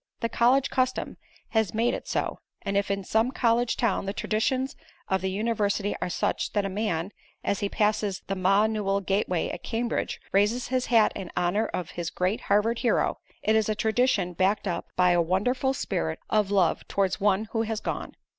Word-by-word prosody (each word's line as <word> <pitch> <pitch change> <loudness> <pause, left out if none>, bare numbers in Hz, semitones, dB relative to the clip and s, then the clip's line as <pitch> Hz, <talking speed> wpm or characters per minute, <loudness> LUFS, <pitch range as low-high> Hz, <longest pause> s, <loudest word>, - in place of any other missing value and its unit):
The 230 - 0
college 255 +4 +3
custom 255 -1 -1 0.3
has 220 -2 0
made 230 +2 +2
it - - -5
so, - - -2 0.2
and 195 - -2
if 200 0 +1
in 200 0 -1
some 220 +5 +2
college 240 -2 +1
town 205 -4 0
the 195 - -1
traditions 255 +6 -1 0.3
of 190 -1 +1
the 190 - -1
university 205 0 0
are - - -1
such - - -1
that 205 -2 +1
a - - -1
man, 190 -3 -2 0.3
as 200 - 0
he 200 - -1
passes 210 -2 0
the 195 - -2
Ma 195 +3 +3
Newell 205 -3 0
gateway 190 -3 0
at - - -6
Cambridge 235 +1 -2
raises 210 +5 +2
his 255 -1 0
hat 225 -3 +5
in 185 - -6
honor 180 +5 +1
of 180 - -4
this 170 -1 -3
great 185 +4 -1
Harvard 210 +3 +2
hero, 240 - +1 0.2
it 220 - +3
is 220 -1 +2
a 215 - +1
tradition 220 -4 +1
backed 195 +4 +1
up 175 - -2
by 180 -1 +4
a 175 0 +4
wonderful 225 +10 +1
spirit 80 - -2
of 210 -2 +2
love 195 -4 +2
towards 195 0 0
one 205 +1 +2
who 225 - 0
has 220 -1 -2
gone. - - -4
210 Hz, 195 wpm, -27 LUFS, 190-230 Hz, 0.3 s, hat